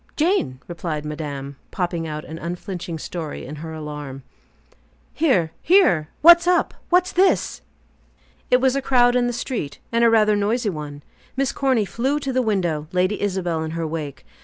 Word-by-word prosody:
"Jane," 310 - +1
replied 165 -3 -4
madame, 145 -3 -5
popping 170 -2 -2
out 150 0 -5
an 160 +1 -8
unflinching 175 -1 -5
story 160 -1 -6
in 150 +4 -8
her 160 +2 -7
alarm. 150 -4 -7 0.9
"Here! 250 - +2
Here! 190 - +4
What's 340 +1 +8
up? 360 -1 +2 0.2
What's 360 +1 +3
this?" 375 +2 +2 0.9
It 250 - +5
was 260 0 +2
a 275 - 0
crowd 245 -2 +4
in 245 -1 +2
the - - 0
street, 240 - -4
and 230 0 +2
rather 215 -1 +4
a - - +2
noisy 210 +2 0
one. 145 -3 -7 0.3
Miss 275 0 +1
Corny 260 -6 +1
flew 265 +8 -1
to 275 -2 -3
the 255 - +2
window, 175 -9 -1
Lady 185 +3 0
Isabel 185 -5 -1
in 160 0 -4
her 165 - -2
wake. 155 -3 -5
180 Hz, 165 wpm, -22 LUFS, 155-250 Hz, 0.9 s, What's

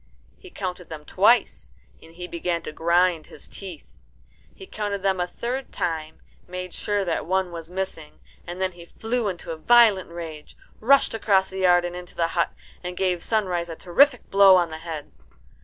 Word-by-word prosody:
He 375 - -13
counted 180 - -6
them 155 -2 -8
twice, 200 - +2 0.3
and 165 - -16
he 180 +1 -6
began 170 0 -2
to - - -6
grind 170 +1 +2
his - - -13
teeth. 185 -6 -10 0.6
He 385 - -11
counted 205 - -4
them 190 -1 +1
a 180 - 0
third 250 +7 -4
time, 160 -2 -3 0.3
made 180 0 -6
sure 205 -1 -1
that 165 -2 -2
one 190 0 0
was 165 -1 -8
missing, 180 -4 -5 0.3
and 175 +1 -6
then 190 0 0
he 170 -1 -14
flew 230 +3 -2
into 175 -3 -5
a 160 - -5
violent 215 0 +5
rage, 165 -3 -9 0.2
rushed 270 +5 +4
across 195 -4 +2
the 190 - -5
yard 175 -1 +4
and 175 0 -5
into 180 0 -9
the 165 -1 0
hut, 170 -1 +1 0.3
and 180 0 -6
gave 180 -3 0
Sunrise 180 -6 0
a 165 - -5
terrific 245 - +2
blow 195 -1 +8
on 175 -3 +2
the 160 - -6
head. 160 -3 -7
180 Hz, 185 wpm, -24 LUFS, 170-195 Hz, 0.6 s, blow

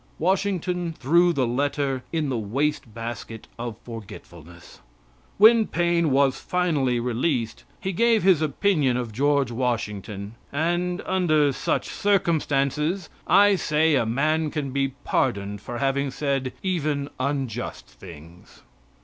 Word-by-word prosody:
Washington 180 -1 0
threw 170 +6 +4
the 135 -6 +1
letter 135 +1 -1
in 160 -4 -1
the 130 - -1
wastebasket 115 -2 -4
of 120 -2 -5
forgetfulness. 85 -7 -11 0.6
When 220 +1 +6
Paine 170 -1 +1
was 135 -1 +2
finally 150 -9 0
released 120 0 -1
he 190 - -3
gave 230 +2 +3
his 185 -5 +4
opinion 150 -4 +1
of 120 -3 -3
George 140 +2 +1
Washington, 105 -4 -3 0.2
and, 175 +4 -1
under 155 -6 +2
such - - -1
circumstances, 160 -3 0 0.2
I 200 +3 +6
say 155 -2 +2
a 135 - +3
man 155 +6 +1
can 145 -3 -3
be 135 0 -1
pardoned 100 -4 -1
for 120 +3 -6
having 140 +1 0
said 135 -1 -2
even 155 -6 -1
unjust 130 -3 -3
things. 85 -1 -14
140 Hz, 120 wpm, -24 LUFS, 120-170 Hz, 0.6 s, When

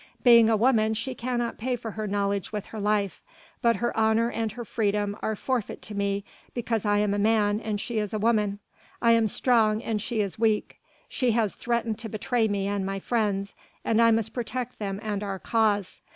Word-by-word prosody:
Being 235 -2 +7
a 220 - +3
woman 220 -2 +3
she 230 +4 -3
cannot 240 -1 -3
pay 250 +2 -1
for 225 -2 -6
her 215 0 -4
knowledge 200 -1 -1
with 210 -2 -4
her 220 - -4
life; 205 -2 0 0.4
but 235 -1 +4
her 240 - -2
honour 225 +1 +2
and 225 -2 -2
her 240 0 -7
freedom 205 -2 0
are 220 - -1
forfeit 245 0 -3
to 215 - -7
me 200 0 -1 0.3
because 230 -3 -1
I 205 0 +3
am 205 -1 +1
a 205 - 0
man 210 -1 +2
and 215 -2 -3
she 230 +1 -2
a 210 - -1
woman. 210 -2 +1 0.4
I 235 - +4
am 230 -1 +4
strong 220 -1 +2
and 215 -2 -1
she 225 +1 -2
is 200 0 -4
weak; 220 -2 0 0.3
she 250 -4 0
has 220 -3 +1
threatened 235 -2 -2
to 225 -1 -6
betray 220 +2 0
me 200 -2 -1
and 200 -1 -1
my 195 +1 -2
friends 200 -2 -1 0.3
and 225 0 +3
I 230 - +6
must 225 -1 +1
protect 250 +1 -4
them 200 -2 -3
and 210 -2 -2
our 200 -2 -3
cause. 205 -2 0
220 Hz, 205 wpm, -26 LUFS, 205-230 Hz, 0.4 s, Being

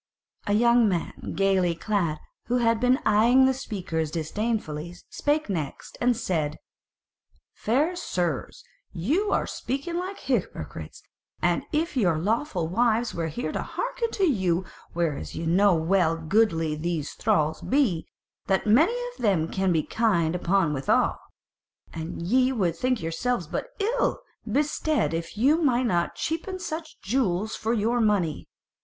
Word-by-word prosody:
A 205 - +2
young 235 0 +5
man 175 -3 -3
gaily 190 -3 +2
clad, 170 -4 -1 0.3
who 245 +2 +1
had 230 -2 +2
been 250 +2 +4
eyeing 240 +5 +5
the 265 - +3
speakers 180 - -3
disdainfully, 170 -1 -3 0.2
spake 300 +1 0
next 160 -9 -4
and 245 -1 +3
said: 160 -9 -1 1.0
"Fair 295 +10 +1
sirs, 175 - -3 0.3
ye 255 - 0
are - - +1
speaking 280 +7 -3
like 370 +2 -4
hypocrites, - - -3 0.4
and - - +1
as - - -21
if 315 0 -1
your 180 -10 +2
lawful 200 - -1
wives 230 +5 +1
were 165 -1 -2
here 240 +11 -3
to - - -2
hearken - - -3
to 395 - -1
you; 190 - +2 0.3
whereas 160 - -2
ye 165 - -4
know 185 +3 +4
well 165 0 +2
how 165 - -10
goodly 165 -4 +2
these 155 -1 -3
thralls 155 0 +1
be, 270 -7 +2
and 160 - -7 0.4
that 190 -1 +1
many 305 - +5 0.2
of - - -14
them 190 -8 +2
can 190 -1 0
be 160 -3 +2
kind 175 -8 +1
enough 180 -2 +1
withal; 135 -1 +1 0.7
and 165 +1 -5
ye 255 +8 +3
would 185 -10 0
think 250 0 0
yourselves 175 +5 -1
but 155 - -4
ill 470 +5 0 0.3
bestead 295 - +1
if 165 +4 -4
ye 265 +7 +4
might 260 -6 +2
not 175 -6 0
cheapen 335 +4 -3
such 320 -3 -6
jewels 215 -3 0
for 220 +1 -2
your 235 +2 +1
money. 195 -8 +1
205 Hz, 150 wpm, -26 LUFS, 170-255 Hz, 1.0 s, young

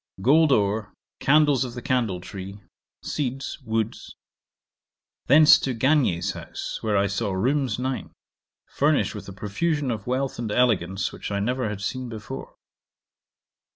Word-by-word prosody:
Gold 155 +4 +5
ore. 105 -3 +1 0.2
Candles 145 -2 +4
of 125 -1 -6
the 120 - -6
candle 115 -9 0
tree. 95 +2 -8 0.4
Seeds. 135 -2 -3
Woods. 110 -1 -3 1.1
Thence 150 +3 +8
to 130 -2 -2
Gagnier's 130 - +2
house, - - -6
where 105 -2 +1
I 100 - +3
saw 100 +1 -1
rooms 125 +3 0
nine, 130 +1 -3 0.6
furnished 145 +1 +1
with 105 -2 -8
a - - -8
profusion 135 - -1
of 110 -2 -5
wealth 130 +1 -1
and 115 -3 -3
elegance 100 -6 +1
which - - -7
I 100 -1 -1
never 125 +2 -1
had 105 -1 -5
seen 125 +5 -3
before. 110 -2 -8
120 Hz, 140 wpm, -25 LUFS, 100-135 Hz, 1.1 s, Thence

